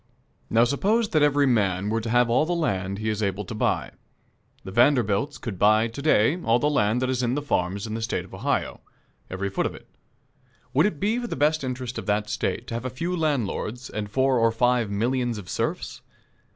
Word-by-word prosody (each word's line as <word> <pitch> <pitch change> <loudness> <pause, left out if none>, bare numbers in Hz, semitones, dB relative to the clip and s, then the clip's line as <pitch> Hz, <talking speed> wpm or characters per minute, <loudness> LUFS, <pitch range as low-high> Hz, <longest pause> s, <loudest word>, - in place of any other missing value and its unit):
Now, 115 +1 +4
suppose 205 - +1
that 155 - +2
every 145 -1 +4
man 100 -6 +1
were 115 0 0
to 115 - -5
have 120 +1 +4
all 120 +5 +3
the 175 - 0
land 100 - -1
he 110 +1 -4
is 110 0 -1
able 100 0 -1
to 115 - -7
buy. 105 - -1 0.7
The 95 - -8
Vanderbilts 120 +2 +2
could 105 -7 -6
buy 110 +2 +4
to 115 +5 -7
day 150 +3 +3
all 115 -4 +3
the 145 +4 +1
land 110 -1 +1
that 130 - 0
is 130 -1 -1
in 125 +3 0
farms 100 -8 -1
in 110 - -5
the 115 - -3
State 110 - -2
of - - -17
Ohio - - -2 0.5
every 95 +1 -3
foot - - 0
of - - -8
it. - - -14 0.9
Would 150 +8 +4
it 160 -9 -5
be 215 +6 +1
for 240 - -4
the - - -4
best 150 +2 +1
interest 125 -1 -4
of - - -9
that 105 +1 0
State 120 - -2
to - - -5
have 115 +1 -3
a - - -1
few 170 +9 -3
landlords 130 - -2
and 105 -1 -4
four 130 +2 +2
or 115 0 +3
five 120 -1 +1
millions 120 +3 -1
of 100 -4 -9
serfs? - - -3
120 Hz, 215 wpm, -25 LUFS, 105-140 Hz, 0.9 s, Now